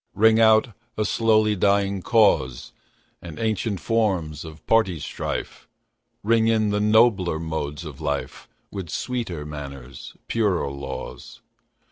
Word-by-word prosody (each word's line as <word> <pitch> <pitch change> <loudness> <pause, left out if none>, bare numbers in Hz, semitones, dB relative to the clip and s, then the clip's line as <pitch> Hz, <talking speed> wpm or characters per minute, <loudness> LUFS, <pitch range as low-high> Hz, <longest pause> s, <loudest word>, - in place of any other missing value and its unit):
Ring 110 +1 +5
out 110 +1 +5 0.3
a 110 - 0
slowly 110 -2 +2
dying 100 0 +1
cause, 75 - +2 0.5
And 85 -3 -9
ancient 110 -3 -1
forms 95 -10 0
of 80 -2 -12
party 105 -7 +2
strife; - - -5 0.6
Ring 115 +1 +3
in 110 -2 +2
the 105 - 0
nobler 105 -5 +3
modes 80 -1 -4
of 75 -4 -9
life, - - -4 0.2
With 95 -5 -6
sweeter 95 - -4
manners, 70 -3 -9
purer 100 -11 0
laws. 70 0 -8
100 Hz, 120 wpm, -23 LUFS, 80-110 Hz, 0.6 s, Ring